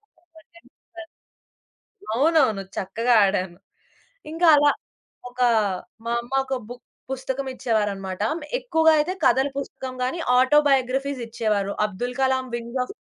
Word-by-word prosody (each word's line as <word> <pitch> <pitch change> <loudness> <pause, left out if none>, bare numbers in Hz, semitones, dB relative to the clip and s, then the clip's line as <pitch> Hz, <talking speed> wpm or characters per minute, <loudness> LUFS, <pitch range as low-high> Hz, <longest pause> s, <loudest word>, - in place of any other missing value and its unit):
Sub 345 +1 -35
వే 320 - -15 0.5
Surfers. 335 -1 -10 1.1
అవునవును. 270 -6 +3
చక్కగా 230 +5 0
ఆడాను. 185 -2 -1 0.7
ఇంకా 335 +2 +1
అలా 290 0 +5 0.6
ఒక 250 +1 -7 0.6
మా 235 - -1
అమ్మ 240 +2 -11
ఒక 265 0 -2
బుక్ 245 0 -10 0.3
పుస్తకం 265 +1 -3
ఇచ్చేవారన్నమాట. 205 -6 -2 0.4
ఎక్కువగా 320 -10 +3
అయితే 300 +5 0
కథల 265 +3 +4
పుస్తకం 265 -2 -6
గాని, 260 +7 -2 0.2
ఆటో 260 +4 +5
బయోగ్రఫీస్ 270 0 0
ఇచ్చేవారు. 210 -3 -1
Abdul 240 +5 -4
Kalam 260 0 +1
wings 235 +2 -5
of 250 - -9
255 Hz, 125 wpm, -23 LUFS, 230-280 Hz, 1.1 s, అలా